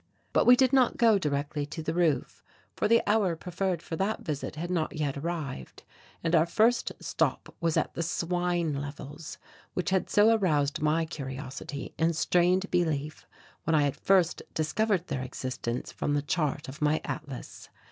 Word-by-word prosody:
But - - +3
we 250 - +10
did 260 +1 +3
not 260 -2 +4
go 225 -4 +5
directly 145 -1 -1
to 160 +2 -6
the 160 - -2
roof, 170 -4 0 0.3
for - - +1
the 230 +1 +4
hour 205 -5 +3
preferred 180 +1 -2
for 165 - -4
that 200 +4 -1
visit 150 -2 -4
had 170 +3 -4
not 165 -3 -1
yet 150 -3 -1
arrived 140 - -5 0.4
and 165 0 0
our 165 0 +5
first 230 +7 +2
stop - - -1
was 165 -2 +1
at - - 0
the - - -3
swine 175 -1 0
levels, 145 +2 -7 0.4
which 180 +1 -1
had 190 -1 +1
so 215 +2 +5
aroused 150 -9 +1
my 155 +2 +2
curiosity 140 -2 -6
and 165 0 +2
strained 180 +4 +2
belief 155 -4 -1 0.4
when 165 - +2
I 150 - +4
had 140 -1 0
first 185 -3 +2
discovered 180 +4 +1
their 130 - -3
existence 130 -1 -4
from 145 - -1
the 145 - 0
chart 145 -1 -1
of 135 +3 -9
my 150 +1 +3
atlas. 145 -5 -7
160 Hz, 170 wpm, -28 LUFS, 145-180 Hz, 0.4 s, we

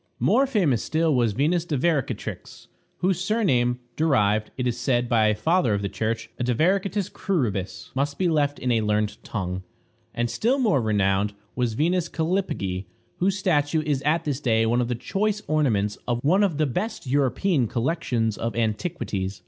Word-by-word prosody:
More 275 +1 +3
famous 175 - +2
still 160 0 +1
was 120 -5 +2
Venus 160 - +1
Divaricatrix, 155 -3 -2 0.4
whose 185 0 +1
surname, 130 - +1 0.2
derived, 110 -9 +2
it 125 - -1
is 120 -2 0
said 120 0 0
by 110 -2 +3
a 105 - +2
father 145 - +2
of 100 - -3
the 100 - -1
Church, 115 +3 -2
a - - 0
divaricatis 190 - +1
cruribus, 115 - -2
must 140 +1 -1
be 185 - +1
left 145 -3 +1
in 125 - -1
a 115 -2 +2
learned 105 0 -1
tongue. 95 -3 -3 0.5
And 120 0 0
still 225 - +1
more 215 - +2
renowned 100 -1 +1 0.2
was 120 -3 -1
Venus 170 +5 +1
Callipyge, 160 - -2 0.3
whose 190 +2 +1
statue 155 -5 +1
is 145 -3 0
at 155 +3 +1
this 145 -4 -2
day 115 -5 +2
one 120 +2 +2
of 120 - -1
the 125 - -1
choice 210 - -1
ornaments 110 -10 +1
of 120 -1 +1
one 180 +8 +4
of 190 -8 +1
the 155 - +2
best 180 - -3
European 140 - +1
collections 120 -4 -1
of 115 -2 -2
antiquities. 110 - -2
135 Hz, 170 wpm, -24 LUFS, 115-170 Hz, 0.5 s, one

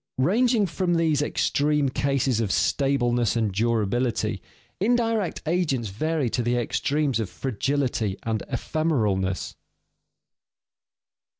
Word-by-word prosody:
Ranging 220 - +3
from 175 0 -1
these 160 -3 +2
extreme 150 0 +1
cases 135 -2 0
of 110 -3 0
stableness 120 -5 +1
and 110 -3 +1
durability, 115 +3 0 0.4
indirect 225 -2 0
agents 150 - 0
vary 155 +7 -1
to - - 0
the 120 +1 0
extremes 140 +2 0
of 110 -4 -2
fragility 130 -4 -1
and 110 -2 -1
ephemeralness. 110 - -1
135 Hz, 100 wpm, -25 LUFS, 115-160 Hz, 0.4 s, Ranging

